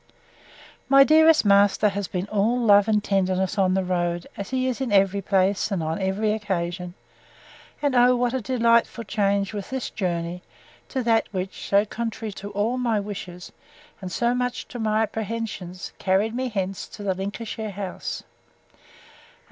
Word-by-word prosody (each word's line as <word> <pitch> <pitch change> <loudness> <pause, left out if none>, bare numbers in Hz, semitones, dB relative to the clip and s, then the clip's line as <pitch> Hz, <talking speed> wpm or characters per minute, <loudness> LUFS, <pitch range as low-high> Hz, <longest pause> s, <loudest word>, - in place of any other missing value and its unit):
My 275 0 +8
dearest 315 -1 +5
master 200 +1 +4
has 200 -1 -3
been 180 0 -3
all 215 +4 +2
love 205 -3 +5
and 210 -1 +2
tenderness 190 0 0
on 185 -1 +3
the 190 - +1
road, 175 -1 -1
as 200 - -6
he 255 0 0
is 260 0 -2
in 255 -4 -2
every 195 0 +3
place, 195 +1 +1
and 190 -6 -2
on 160 +5 -2
every 200 +3 0
occasion. 180 -4 -3 0.9
And 285 -2 +2
oh, 250 0 +5
what 245 0 0
a 260 - -1
delightful 235 -1 +2
change 200 -1 0
was 200 -2 -5
this 265 -1 -4
journey, 175 -3 -3 0.5
to 260 -2 -2
that 225 -1 +2
which, 190 -1 -5
so 200 +1 +3
contrary 225 0 -4
to 200 +1 -8
all 210 +5 -1
my 230 -4 +1
wishes, 190 -3 -7 0.5
and 185 -1 -6
so 235 +5 +1
much 250 0 -2
to 245 - -7
my 220 0 +1
apprehensions, 215 -4 -5
carried 200 +4 +1
me 255 +1 -2
hence 195 -3 -3
to 205 - -10
the 195 -2 0
Lincolnshire 210 +3 -5
house! 195 -2 -5
205 Hz, 165 wpm, -24 LUFS, 190-230 Hz, 0.9 s, My